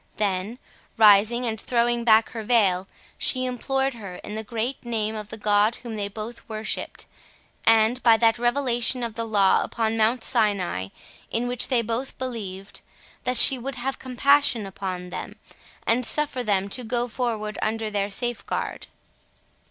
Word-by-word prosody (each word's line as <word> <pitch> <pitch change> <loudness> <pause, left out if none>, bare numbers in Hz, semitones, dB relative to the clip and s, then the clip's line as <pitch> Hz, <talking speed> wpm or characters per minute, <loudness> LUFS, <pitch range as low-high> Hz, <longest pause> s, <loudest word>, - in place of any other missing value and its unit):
Then 205 +2 -2 0.4
rising, 220 +3 +5
and 220 -2 -3
throwing 240 -1 +1
back 220 -1 +4
her 225 - -5
veil, 200 -5 +2 0.3
she 255 -1 +2
implored 265 +2 -1
her 200 -6 -9
in 210 - -7
the 220 +1 -4
great 235 +4 -4
name 220 -3 -2
of 210 -1 -6
the 220 - -7
God 210 +2 +2
whom 235 -3 -8
they 205 -1 -2
both 220 +3 -8
worshipped, 215 0 -4 0.6
and 225 +2 +4
by 230 -2 +5
that 225 0 +2
revelation 245 0 0
of 230 -2 -3
the 230 +1 -3
Law 205 -3 +3
upon 225 -1 -2
Mount 225 +2 +2
Sinai, 200 - +1 0.4
in 235 +2 -1
which 245 -1 +1
they 245 -3 +1
both 230 +4 -3
believed, 205 -7 -6 0.4
that 250 0 0
she 265 - +8
would 270 +3 -5
have 265 +2 -4
compassion 260 -2 +2
upon 185 -2 -6
them, - - -7 0.5
and 235 +3 +2
suffer 285 0 +1
them 200 -3 +1
to 250 +5 -2
go 240 +1 -1
forward 220 -3 -3
under 220 0 -2
their 200 -1 -1
safeguard. 240 +1 -3
225 Hz, 160 wpm, -24 LUFS, 210-245 Hz, 0.6 s, she